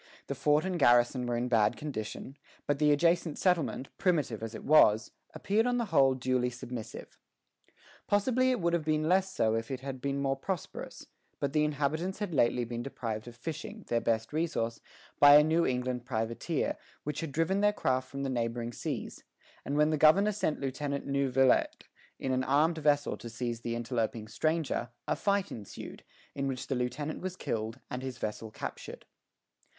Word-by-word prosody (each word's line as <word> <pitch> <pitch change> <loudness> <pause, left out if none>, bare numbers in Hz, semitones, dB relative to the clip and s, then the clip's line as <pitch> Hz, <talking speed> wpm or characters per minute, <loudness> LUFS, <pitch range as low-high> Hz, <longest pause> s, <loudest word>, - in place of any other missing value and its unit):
The - - -3
fort 150 +3 +2
and 185 -2 -2
garrison 120 -1 +4
were 120 -1 0
in 120 +1 -1
bad 115 -4 +3
condition; 135 -2 -6 0.3
but 145 -1 0
the 150 -1 +4
adjacent 165 +1 +2
settlement, 170 -7 0
primitive 145 - +1
as 115 0 -5
it - - -8
was, 110 -8 +5 0.2
appeared 220 +4 +1
on 245 0 +1
the 235 - 0
whole 135 -1 +5
duly 125 -1 0
submissive. 120 -2 -8 0.9
Possibly 255 +5 +2
it 255 -2 +1
would 170 -1 +1
have 170 -2 +1
been 155 0 +1
less 190 +2 +3
so 110 -11 +1
if 115 0 -2
it 130 -2 -4
had 135 -1 -6
been 140 0 -1
more 135 -1 +1
prosperous; 180 +4 -5 0.3
but 140 -1 -1
the 150 - +3
inhabitants 150 +5 -1
had 205 -4 -4
lately 120 -3 +2
been 120 0 -4
deprived 115 -4 -5
of 120 - -9
fishing, 165 - -6
their 115 0 +1
best 115 +2 -1
resource, 150 -8 -1 0.4
by 145 0 +9
a 150 - +8
New 165 +2 +2
England 125 -1 -1
privateer 115 +6 -2 0.3
which 150 0 -3
had 160 -3 -4
driven 165 +7 +1
their 205 0 +5
craft 130 -9 -1
from 140 +1 -5
the 135 - -1
neighboring 120 -1 -2
seas; - - -5 0.4
and 145 - -2
when 150 +1 +4
the 155 - +1
governor 175 +8 +5
sent 190 -6 -1
Lieutenant 140 +1 -3
Neuvillette 135 -2 +2 0.3
in 130 - -2
an 130 0 +1
armed 155 +5 +2
vessel 145 -1 +2
to 120 - -8
seize 120 0 -3
the 115 0 -3
interloping 115 -1 -2
stranger, 155 +1 -1 0.2
a - - +1
fight 200 -1 0
ensued, 105 -3 -9 0.3
in 140 0 -2
which 130 -1 -3
the 135 - -2
lieutenant 125 +5 -3
was 185 0 -4
killed, 110 -6 -3
and 125 - -3
his 130 -2 -5
vessel 110 0 -4
captured. 110 - -7
135 Hz, 180 wpm, -30 LUFS, 120-160 Hz, 0.9 s, by